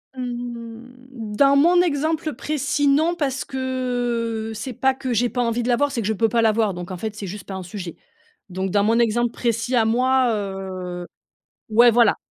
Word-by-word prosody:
Mmh, 240 -1 -7
dans 280 +3 +5
mon 345 +5 +5
exemple 315 -1 0
précis, 290 -1 -1
non, 315 +5 +3
parce 275 -5 -2
que 245 -4 -2
c'est 240 +4 -5
pas 265 +3 +2
que 260 -1 -5
j'ai 240 +1 +2
pas 245 - -2
envie 235 0 0
de - - -3
la 240 - +4
voir, 285 +2 +1
c'est 240 -4 -2
que 205 - -2
je 220 - +1
peux 225 +2 +1
pas 230 +1 +2
la 220 - +5
voir. 215 -3 +1
Donc 175 +1 -7
en 185 - -5
fait, 215 +2 -5
c'est 205 - -6
juste 200 0 -7
pas 195 - -6
un 190 - -5
sujet. 180 -2 -7 0.5
Donc 190 +1 -3
dans 200 0 +3
mon 225 +2 +3
exemple 235 +1 +2
précis 235 +1 -1
à 225 -2 +4
moi, 255 +2 +3
heu, 190 -3 -5 0.6
ouais, 235 +2 +6
voilà, 235 0 +4
235 Hz, 205 wpm, -22 LUFS, 215-260 Hz, 0.6 s, ouais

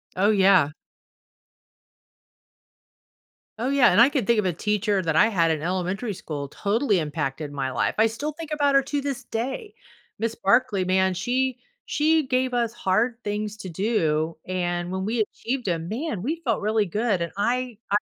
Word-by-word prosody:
Oh, 200 +3 +3
yeah. 190 -7 +5 2.9
Oh, 250 +3 -1
yeah, 275 -6 +5
and 190 +6 +5
I 250 - +7
could 270 -7 -1
think 235 +1 +3
of 210 - 0
a 180 - +1
teacher 210 +2 0
that 160 -2 0
I 210 - +6
had 170 -7 +2
in 155 -2 -1
elementary 185 +5 -2
school 145 -5 -5
totally 205 - 0
impacted 150 -2 -3
my 135 -2 -2
life. - - 0
I 225 - +6
still 285 +8 -4
think 320 +1 -9
about 290 -2 +2
her 275 - +6
to 285 +1 -2
this 275 -2 -4
day. 340 - -4 0.4
Ms. 230 0 -1
Barkley, 200 -2 +3
man, 190 0 +2
she 250 +6 -1 0.3
she 315 0 +2
gave 255 0 0
us 235 -1 0
hard 230 +2 +1
things 210 0 -3
to 190 - -7
do, 165 -5 0
and 175 -1 -2
when 190 0 -2
we 225 +2 -1
achieved 240 +3 -3
'em, 165 -2 -1
man, 225 - -3
we 315 +6 -1
felt 240 -11 -1
really 215 0 +1
good, 205 -1 0
and 170 - -2
I 245 +2 -1
I 205 - +4
210 Hz, 175 wpm, -24 LUFS, 180-250 Hz, 2.9 s, I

